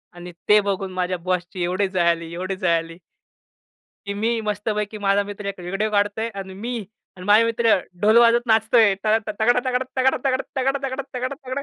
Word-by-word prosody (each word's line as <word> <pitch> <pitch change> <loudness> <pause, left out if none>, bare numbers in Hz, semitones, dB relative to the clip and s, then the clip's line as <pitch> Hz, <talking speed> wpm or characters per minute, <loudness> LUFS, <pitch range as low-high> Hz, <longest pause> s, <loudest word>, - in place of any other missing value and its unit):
आणि 175 0 -9 0.2
ते 210 0 +7
बघून 195 -1 -3
माझ्या 185 0 -1
बॉसची 180 0 -3
एवढी 185 +3 0
जळाली, 170 -3 0
एवढी 185 +2 -3
जळाली. 165 -2 -1 1.1
की 200 - -3
मी 225 +3 0
मस्तपैकी 210 0 -3
माझा 200 +1 +3
मित्र 205 0 -8
एक 200 - -5
व्हिडिओ 195 +5 -2
काढतो 205 +1 0
आहे 230 - -1
आणि 190 -1 -7
मी 230 +6 -5 0.4
आणि 180 - -9
माझे 210 +3 +6
मित्र 230 0 +3 0.3
ढोल 215 +2 +5
वाजत 235 +1 +4
नाचतो 220 +1 +3
आहे 215 -3 +6
त 200 +3 -7 0.3
तगडा 245 +3 +4
तगडा 255 0 0
तगडा 260 +1 +3
तगडा 260 -1 +1
तगडा 265 - 0 0.2
तगडा 270 0 -3
तगडा 255 +2 -3
तगडा 255 +2 -3
205 Hz, 185 wpm, -22 LUFS, 185-230 Hz, 1.1 s, ते